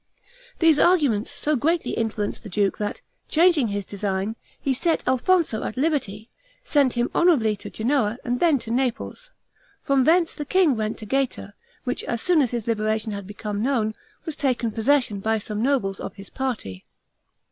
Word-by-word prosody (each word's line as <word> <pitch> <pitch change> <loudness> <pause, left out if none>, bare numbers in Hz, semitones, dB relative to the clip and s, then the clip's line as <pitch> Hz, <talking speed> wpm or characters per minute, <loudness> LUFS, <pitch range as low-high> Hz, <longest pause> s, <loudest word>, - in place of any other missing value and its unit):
These 325 -3 +4
arguments 285 - +3
so 295 +1 -1
greatly 325 +6 0
influenced 220 -2 -2
the 215 - -9
duke, 195 +1 0
that, 205 -1 -3 0.3
changing 330 -5 +4
his 200 -1 -3
design, 200 +1 -2 0.2
he 275 - 0
set 325 +6 0
Alfonso 260 -1 +2
at - - -5
liberty, 255 -8 -1 0.4
sent 285 - +2
him 240 0 -1
honorably 270 -12 +3
to - - -8
Genoa 230 -2 0
and 245 0 -1
then 330 -5 +4
to 230 -2 -6
Naples. 260 - -2 0.5
From 275 -2 +2
thence 335 +2 +3
the 300 - -5
king 335 -2 +3
went 215 0 -2
to 220 - -9
Gaeta, 265 -4 -2 0.3
which 250 - -3
as 235 - -2
soon 340 +4 +3
as 255 - +1
his 235 -2 -3
liberation 215 -1 -1
had 200 -2 -6
become 205 0 -4
known, 230 -4 +1 0.3
was 320 - -3
taken 250 -6 0
possession 240 -1 +2
of 195 - -9
by 220 0 +2
some 210 0 -4
nobles 235 -7 0
of - - -6
his 195 -2 -11
party. 230 - -4
240 Hz, 175 wpm, -24 LUFS, 215-290 Hz, 0.5 s, These